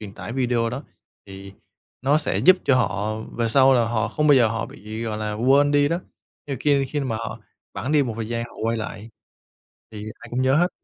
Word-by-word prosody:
truyền 105 -2 -8
tải 115 - -7
video 120 -3 0
đó, 125 +4 -5 0.4
thì 95 0 -10 0.5
nó 140 +3 +3
sẽ 150 - -1
giúp 185 +1 +6
cho 135 - +4
họ 105 -2 -1 0.2
về 115 -1 0
sau 135 +2 +5
là 120 -2 +3
họ 115 -2 0
không 150 - -1
bao 145 - +7
giờ 120 -4 +5
họ 115 +1 -3
bị, 110 +2 -8
gọi 110 -2 -3
là, 105 -1 -3
quên 135 +6 +3
đi 145 0 +3
đó. 170 +3 -1 0.5
Nhưng 140 - -3
mà - - -8
ki 140 -2 +2
khi 145 - -2
mà 130 -5 -2
họ 115 0 -6 0.3
bẵng 140 - -3
đi 150 - +4
một 125 -4 -3
thời 115 -1 -4
gian 115 0 -2
họ 120 - -13
quay 115 +1 0
lại, 110 0 -6 0.8
thì 105 -1 -8 0.2
ai 120 - -11
cũng 125 +2 -1
nhớ 130 +1 +3
hết. 175 +2 +3
120 Hz, 240 wpm, -23 LUFS, 110-140 Hz, 0.8 s, bao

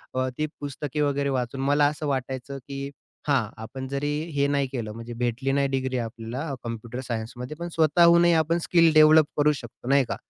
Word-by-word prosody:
अ, 130 0 +1
ती 155 - 0
पुस्तके 145 +1 -4
वगैरे 140 -1 +1
वाचून 130 0 -2
मला 145 +2 +3
असं 150 +1 -3
वाटायचं 130 0 -3
की 140 0 -5 0.4
हां, 130 -7 +2
आपण 130 +4 -7
जरी 140 +2 -2 0.2
हे 140 -1 +1
नाही 140 -1 +1
केलं, 115 -5 -4
म्हणजे 115 +2 -8
भेटली 125 +2 -1
नाही 140 0 +2
डिग्री 130 -1 -1
आपल्याला 120 +5 -5
कॉम्प्युटर 115 +1 -6
सायन्समध्ये, 120 +4 -5
पण 170 - -4
स्वतःहूनही 170 +2 +5
आपण 165 +2 0
स्किल 165 -2 +4
डेव्हलप 155 0 +7
करू 150 0 +4
शकतो, 120 -2 -10
नाही 140 0 +5
का? - - -1
140 Hz, 180 wpm, -25 LUFS, 125-150 Hz, 0.4 s, डेव्हलप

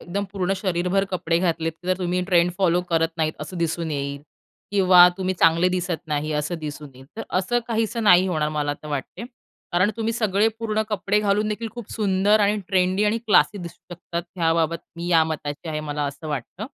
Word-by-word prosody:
एकदम 200 +3 -3
पूर्ण 195 -1 -1
शरीरभर 185 0 0
कपडे 170 -2 0
घातलेत 165 -2 0
जर 185 0 +1
तुम्ही 180 0 -1
ट्रेंड 175 -1 +4
फॉलो 180 -2 +3
करत 165 -1 +2
नाहीत 155 -2 0
असं 165 +4 -7
दिसून 165 0 -2
येईल. 140 -1 -4 0.5
किंवा 185 -3 +7
तुम्ही 185 -1 -1
चांगले 170 +1 +4
दिसत 180 -2 -3
नाही 150 0 -2
असं 150 +3 -2
दिसून 150 -1 -7
येईल. 130 +1 -14
तर 225 - -4 0.2
असं 190 +6 0
काहीसं 225 0 -1
नाही 185 -2 +6
होणार 155 -3 0
मला 145 -1 0
तर 155 - -8
वाटते. 145 - -5 0.5
कारण 185 +4 +3
तुम्ही 225 0 -1
सगळे 215 -2 +2
पूर्ण 220 -1 -1
कपडे 210 -1 0
घालून 210 +1 +1
देखील 220 +2 -3
खूप 240 -3 -9
सुंदर 205 0 +2
आणि 205 +1 +3
ट्रेंडी 190 +1 +2
आणि 210 +2 +1
क्लासी 210 -1 +4
दिसू 175 0 -9
शकतात 170 0 -5
ह्याबाबत 165 -1 +1 0.2
मी 170 +1 -5
ह्या 165 -2 +4
मताची 155 0 -5
आहे 155 -1 -2
मला 150 -1 -3
असं 145 +3 -7
वाटतं. 150 - -5
180 Hz, 190 wpm, -23 LUFS, 160-200 Hz, 0.5 s, किंवा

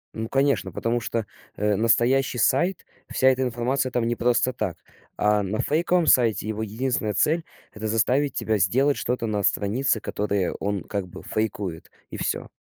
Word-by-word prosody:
Ну 110 0 -4
конечно, 140 +1 +1
потому 120 +1 -1
что, 115 0 -2 0.3
э, 105 0 +1
настоящий 125 +4 +2
сайт, 175 +7 +1 0.3
вся 130 - +4
эта 130 0 +1
информация 130 +2 0
там 120 -1 0
не 120 - 0
просто 125 +2 +1
так. 105 -7 -3 0.4
А 105 0 +3
на 100 +3 -3
фейковом 170 +6 +2
сайте, 115 -7 +3
его 110 0 -3
единственная 110 0 -1
цель- 160 +7 +2 0.3
это 110 0 -5
заставить 125 +6 +1
тебя 110 -1 0
сделать 135 +11 +2
что-то 125 -1 -2
на 105 -2 -1
странице, 110 +6 +1
которые 100 -3 -1
он 100 -3 -2
как 100 -3 -4
бы - - -11
фейкует, 100 -6 -3 0.2
и - - -6
всё. - - -2
115 Hz, 165 wpm, -24 LUFS, 105-130 Hz, 0.4 s, вся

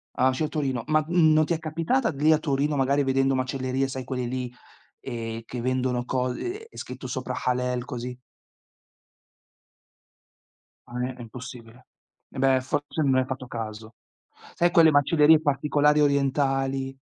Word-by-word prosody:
Ah, 130 - +3
vicino 130 +4 -1
Torino, 135 -6 -2
ma 155 0 +3
non 160 -3 +4
ti 165 - 0
è 160 - -2
capitata 165 - 0
lì 150 +2 +2
a 155 - +5
Torino, 145 -1 0
magari 140 +1 +2
vedendo 135 0 +2
macellerie, 130 +1 -1
sai, 130 -1 -5
quelle 125 -1 -3
lì, 125 0 -4 0.5
ehm, 115 -3 -5
che 125 +2 -7
vendono 125 0 -1
co 125 0 -1
ehm, 380 - -5
è - - -16
scritto 130 +1 -7
sopra 125 0 -4
Halal, 125 0 0
così? 125 -1 -6 2.7
Ah, 120 +1 -6
è 130 - -6
è 125 - -11
impossibile. 120 +1 -11 0.4
E 135 - -8
beh, 135 -1 +3
forse 145 +3 -2
non 135 -2 +3
hai 130 0 +2
fatto 130 -1 -6
caso. 110 -1 -7 0.6
Sai, 175 0 +2
quelle 165 -2 +6
macellerie 150 +2 +5
particolari 150 0 +2
orientali? 135 -1 +1
135 Hz, 150 wpm, -25 LUFS, 125-150 Hz, 2.7 s, quelle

